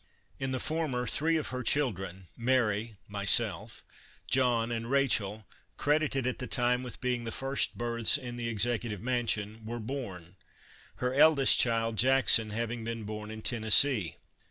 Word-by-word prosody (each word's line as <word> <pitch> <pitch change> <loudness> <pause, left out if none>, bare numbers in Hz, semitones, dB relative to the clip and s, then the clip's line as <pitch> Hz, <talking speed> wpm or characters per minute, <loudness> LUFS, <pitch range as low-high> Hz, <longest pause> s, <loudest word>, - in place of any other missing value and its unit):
In 135 0 -3
the 130 - -2
former 155 -6 -2
three 160 +7 +2
of 155 - -4
her 125 0 -4
children, 95 -8 -1
Mary 115 -3 0
(myself), 100 -1 +1 0.4
John 120 -3 +1
and 115 0 -4
Rachel, 110 -6 0 0.3
credited 145 -3 0
at 130 - -2
the 125 - -4
time 125 0 +1
with 125 -1 -8
being 125 -2 -2
the 115 - -5
first 135 +3 0
births 115 0 +2
in 125 -4 -8
the 120 -1 -4
Executive 115 -1 -1
Mansion, 110 -2 -2
were 115 +2 -6
born, 100 -8 -7 0.6
her 125 0 -2
eldest 140 -1 +5
child, 115 -1 +1
Jackson, 125 -3 +3
having 115 +2 -4
been 115 0 -5
born 105 0 -7
in 110 0 -9
Tennessee. 110 - +4
120 Hz, 150 wpm, -29 LUFS, 110-130 Hz, 0.6 s, eldest